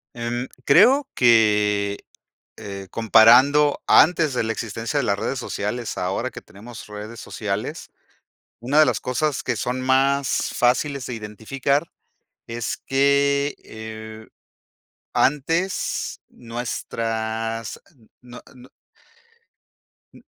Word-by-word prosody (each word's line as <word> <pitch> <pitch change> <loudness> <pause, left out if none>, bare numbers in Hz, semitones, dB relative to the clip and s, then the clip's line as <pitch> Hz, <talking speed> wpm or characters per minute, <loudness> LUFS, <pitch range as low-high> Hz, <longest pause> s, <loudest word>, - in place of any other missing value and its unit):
Em, 120 +1 -4 0.2
creo 245 - +5
que, 105 -4 +3 0.5
eh, 100 -2 -8
comparando 125 +7 +5
antes 160 -3 +5
de 125 - 0
la 115 0 -1
existencia 115 +4 -4
de - - 0
las 100 -3 0
redes 130 +5 -2
sociales, 120 -1 -4
ahora 95 +8 -2
que - - -10
tenemos 110 +4 -12
redes 105 +2 -9
sociales, 105 -1 -5 0.7
una 130 +6 +1
de 155 - +7
las - - 0
cosas 140 +3 -1
que 125 - -2
son 125 +4 -3
más 135 +1 +1
fáciles 130 +2 +1
de 125 - -5
identificar 135 +8 -2 0.6
es 115 0 -4
que, 140 +1 +2
eh, 110 0 -9 0.9
antes 165 +7 0
nuestras 115 -1 -4 0.4
no 125 0 -12
no. 125 +1 -16 1.4
N - - -17
120 Hz, 105 wpm, -22 LUFS, 110-140 Hz, 1.4 s, de